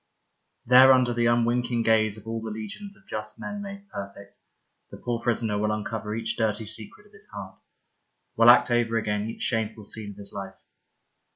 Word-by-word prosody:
There 130 +2 +8
under 125 -2 +3
the 120 0 +2
unwinking 120 0 +1
gaze 110 -2 +3
of 110 - -13
all 115 0 -3
the 110 - -5
legions 110 - -7
of 190 - -24
just 110 0 -5
men 205 0 -5
made 200 0 -8
perfect, 100 - -9 0.5
the - - -10
poor 120 -1 -3
prisoner 110 -3 0
will 105 +1 +1
uncover 105 0 -3
each 115 0 -3
dirty 110 -1 0
secret 110 - -8
of 210 - -23
his 200 - -15
heart, 95 -2 -9 0.8
will 115 +1 +7
act 120 0 +7
over 115 -1 +2
again 105 0 -1
each - - -6
shameful 110 -2 -2
scene 105 0 -5
of 100 - -11
his 100 -1 -10
life. 95 -1 -7
110 Hz, 185 wpm, -26 LUFS, 105-120 Hz, 0.8 s, There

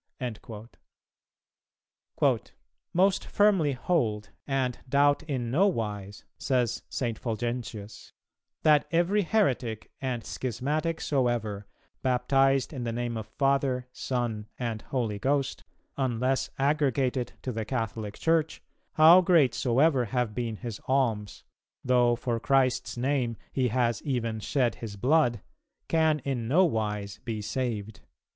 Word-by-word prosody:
'"[270:1] 115 -2 -7 2.1
"Most 190 +2 +3
firmly 195 -9 +3
hold, 120 -8 -1 0.2
and 130 -3 -1
doubt 145 +1 +4
in 130 -7 -3
no 185 +10 +4
wise," 105 - -4
says 125 -4 0
St. 115 -4 -2
Fulgentius, 115 -3 -5 0.5
"that 150 -2 +5
every 175 +5 +2
heretic 130 - 0
and 125 -4 -3
schismatic 145 +7 -2
soever, 120 -7 -1 0.3
baptized 135 +2 +2
in 130 -4 -4
the 115 - -2
name 120 0 -3
of 110 -2 -5
Father, 135 0 +1
Son, 120 -4 -3
and 115 -3 -3
Holy 115 -6 -2
Ghost, 135 +2 -1 0.3
unless 130 0 0
aggregated 135 -3 +1
to 130 - -2
the 110 -1 -3
Catholic 110 -3 -3
Church, 160 -1 0 0.3
how 165 +4 +8
great 165 -9 +4
soever 130 +1 +2
have 120 -1 -1
been 115 -1 -3
his 115 -1 -7
alms, 115 -7 0 0.4
though 125 -1 +4
for 120 -1 -2
Christ's 130 -3 +1
Name 125 -3 0 0.2
he 130 -2 +1
has 120 0 0
even 115 -5 -2
shed 120 +1 +1
his 110 -3 -6
blood, 125 -1 +2 0.5
can 160 -2 +3
in 125 -5 -2
no 175 +9 +5
wise 105 - -2
be 115 -3 -3
saved." 110 -2 -3
125 Hz, 120 wpm, -28 LUFS, 115-140 Hz, 2.1 s, how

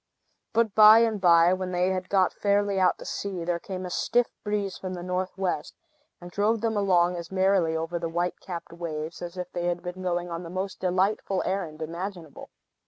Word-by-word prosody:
But 225 -2 +2
by 215 +1 +9
and 220 -3 0
by, 170 -1 +6
when 185 0 -3
they 180 +1 +2
had 185 -1 -3
got 190 -2 +3
fairly 200 -1 +1
out 185 - +3
to - - -11
sea, 190 -4 -4
there 175 0 -1
came 185 +1 -6
a 180 - -6
stiff 245 +6 +1
breeze 205 -2 -2
from 185 -1 -5
the 175 - -7
north 185 +1 -3
west, 185 -6 -2 0.4
and 175 0 -10
drove 210 +4 +1
them 225 -1 0
along 180 -3 +2
as 170 0 -7
merrily 190 -4 +2
over 165 +2 -3
the 165 -1 -3
white 175 +2 -2
capped 175 -3 -7
waves 165 -2 -5
as 175 +1 -7
if 180 0 -5
they 175 - -3
had 175 0 -2
been 180 +1 -6
going 175 -1 -2
on 170 0 -4
the 170 - -8
most 185 +2 -4
delightful 190 +1 0
errand 170 -5 -3
imaginable. 170 -1 -7
185 Hz, 205 wpm, -26 LUFS, 175-195 Hz, 0.4 s, by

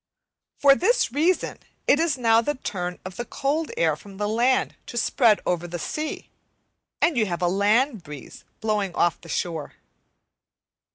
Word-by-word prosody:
For 280 -1 +7
this 440 - +2
reason 325 +7 +1 0.3
it 290 - +4
is 320 -5 +1
now 230 -2 +4
the 295 +5 -1
turn 180 -8 -4
of 185 -1 -8
the 240 - -2
cold 295 +6 -1
air 160 -2 +2
from 195 +5 -13
the 205 0 -1
land 240 +4 +2
to 240 - -7
spread 230 -1 +3
over 175 -1 -1
the 175 0 -5
sea, 305 - -5 0.7
and 340 - +3
you 220 -3 +2
have 175 0 -3
a - - +3
land 210 +6 +2
breeze 150 -3 -11 0.2
blowing 210 -4 -1
off 175 -1 +1
the - - -13
shore. 165 -4 -3
220 Hz, 165 wpm, -24 LUFS, 180-275 Hz, 0.7 s, For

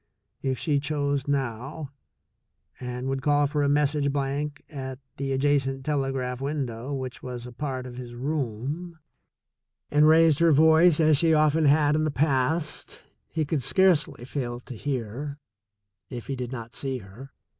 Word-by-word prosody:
If 130 -1 -1
she 145 0 +1
chose 145 -1 -1
now, 140 +2 -3 0.9
and 125 0 -5
would 135 0 -1
call 145 +1 +3
for 145 +1 -1
a 140 - +2
message 145 0 +2
blank 145 +1 -2
at 130 -3 -6 0.2
the 135 0 -2
adjacent 135 -1 +1
telegraph 135 -4 -1
window 135 -3 -3
which 130 -2 -5
was 125 -1 -6
a 125 - -8
part 130 0 -4
of 125 -1 -9
his 120 -1 -8
room, 145 +5 -3 0.9
and 150 +1 +5
raised 160 -1 +5
her 165 -1 +5
voice 160 +2 +6
as 155 -2 +5
she 160 +1 +4
often 155 +1 +3
had 145 +1 +4
in 155 - +1
the 155 - +1
past, 150 +2 0 0.3
he 160 -1 -1
could 145 -1 -1
scarcely 170 -5 +2
fail 120 -3 -4
to 125 - -9
hear, 135 +3 -4 0.7
if 120 -2 -7
he 135 - -3
did 125 -1 -5
not 115 -2 -7
see 135 -2 -2
her. 115 +5 -11
140 Hz, 155 wpm, -26 LUFS, 130-150 Hz, 0.9 s, voice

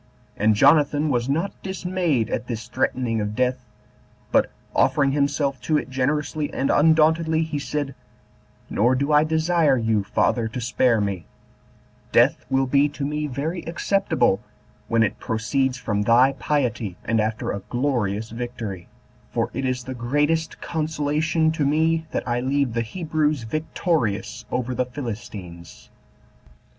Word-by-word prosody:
And 110 +1 +3
Jonathan 150 +5 +4
was 120 -1 0
not 165 +8 0
dismayed 180 - -1
at 120 - -2
this 115 -2 -5
threatening 120 -2 -1
of 105 0 -3
death, 125 +1 0 0.7
but, - - +3 0.3
offering 140 -1 +3
himself 140 -1 0
to 155 - +1
it 135 - -4
generously 145 +3 -1
and 135 - 0
undauntedly, 160 +1 +4
he 155 -2 -3
said, 145 -1 -3 0.7
"Nor 120 +5 +2
do 140 +3 0
I 150 0 +6
desire 160 -2 +2
you, 110 -3 +1
father, 110 +3 +1
to 110 - -5
spare 120 -1 +2
me: 100 -4 -2 0.8
death - - +3
will 135 0 +2
be 140 +3 +3
to 145 0 -5
me 150 +1 -2
very 150 +6 -3
acceptable, 165 - +1 0.5
when 115 -1 +3
it 110 - -1
proceeds 125 +4 -1
from 105 -4 -1
thy 120 +5 +5
piety, 120 -9 -1
and 115 -1 +2
after 110 +1 -2
a 100 - -3
glorious 115 -5 -1
victory; 115 -6 -5 0.4
for - - -1
it 135 +3 -2
is 130 -1 -1
the 130 +1 -6
greatest 145 +6 0
consolation 160 0 0
to 160 -2 -1
me 160 +3 +1
that - - -3
I 120 0 0
leave 135 -1 0
the 115 - 0
Hebrews 155 0 -1
victorious 120 - -2
over 125 0 -2
the 125 - 0
Philistines." 105 - -8
135 Hz, 145 wpm, -23 LUFS, 115-150 Hz, 0.8 s, I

